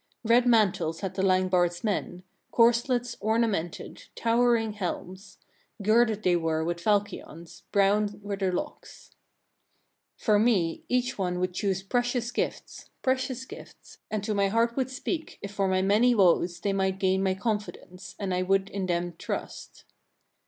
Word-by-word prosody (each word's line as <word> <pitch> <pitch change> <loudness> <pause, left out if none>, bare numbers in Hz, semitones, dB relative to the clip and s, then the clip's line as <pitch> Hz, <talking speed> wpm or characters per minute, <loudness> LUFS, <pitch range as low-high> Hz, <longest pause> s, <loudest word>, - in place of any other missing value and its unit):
Red 235 +2 +4
mantles 185 -8 +2
had 190 -2 -3
the 190 - -2
Langbard's 185 -2 +2
men, 185 -4 -2 0.3
corslets 240 +1 +2
ornamented, 215 -6 -1
towering 230 -1 +2
helms; 190 0 -6 0.4
girded 215 +1 +2
they 180 -1 +3
were 160 -2 0
with 170 +1 -3
falchions, 170 -4 -2
brown 205 +1 +2
were 205 0 -3
their 190 -2 -1
locks. 180 - -6 1.1
20. - - -19
For 210 -2 +4
me 200 -8 +1
each 250 -2 0
one 180 -1 -1
would 185 0 -1
choose 190 0 -1
precious 245 +2 -1
gifts, - - -4
precious 260 -1 -1
gifts, - - -13
and 215 -2 -2
to 215 - -1
my 200 -1 +2
heart 230 +3 +1
would 260 -1 -1
speak, 305 +5 -4
if 200 - -7
for 195 -1 0
my 185 0 +1
many 220 +5 +4
woes 175 -3 +3
they 200 - 0
might 190 -1 0
gain 190 0 +1
my 190 -1 +1
confidence, 205 -3 -5
and 195 -3 -3
I 180 - 0
would 195 +1 +1
in 195 -2 -3
them 175 0 -1
trust. - - -6
200 Hz, 150 wpm, -27 LUFS, 185-230 Hz, 1.1 s, Red